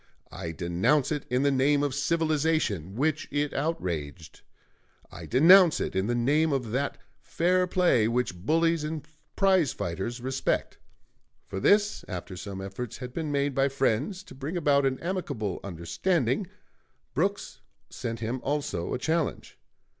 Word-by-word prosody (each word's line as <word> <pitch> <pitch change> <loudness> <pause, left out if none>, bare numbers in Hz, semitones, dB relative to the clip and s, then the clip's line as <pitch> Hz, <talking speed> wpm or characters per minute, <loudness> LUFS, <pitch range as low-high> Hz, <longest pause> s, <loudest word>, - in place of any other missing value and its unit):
I 85 -2 -5
denounce 90 - +1
it 150 -2 -3
in 125 +2 +1
the 140 - +3
name 140 +2 +3
of 145 -2 0
civilization, 150 - 0
which 155 +5 0
it 145 0 -1
outraged. 85 - -3 0.7
I - - -9
denounce 170 +6 +7
it - - -3
in 95 +2 +1
the 120 - 0
name 150 +7 +2
of 125 -5 -1
that 140 +4 -1 0.2
fair 180 +2 +1
play 175 - +3
which 120 -4 0
bullies 165 +4 +2
and 150 -1 -5 0.3
prize 190 - +3
fighters 95 +8 -4
respect." 130 +2 -2 0.7
For 95 - -5
this, 205 - +3
after 90 0 -6
some 95 +2 -6
efforts 100 +4 -6
had 125 -1 -7
been 155 -1 -3
made 140 0 0
by 135 +1 +2
friends 135 - 0
to - - -13
bring 140 +6 -4
about 140 -4 +3
an 130 -1 -2
amicable 155 - -3
understanding, 115 - -1 0.7
Brooks - - -2 0.3
sent 115 -1 -5
him 115 +3 -2
also 140 - -2
a - - -1
challenge. 160 +3 -2
135 Hz, 145 wpm, -27 LUFS, 110-160 Hz, 0.7 s, denounce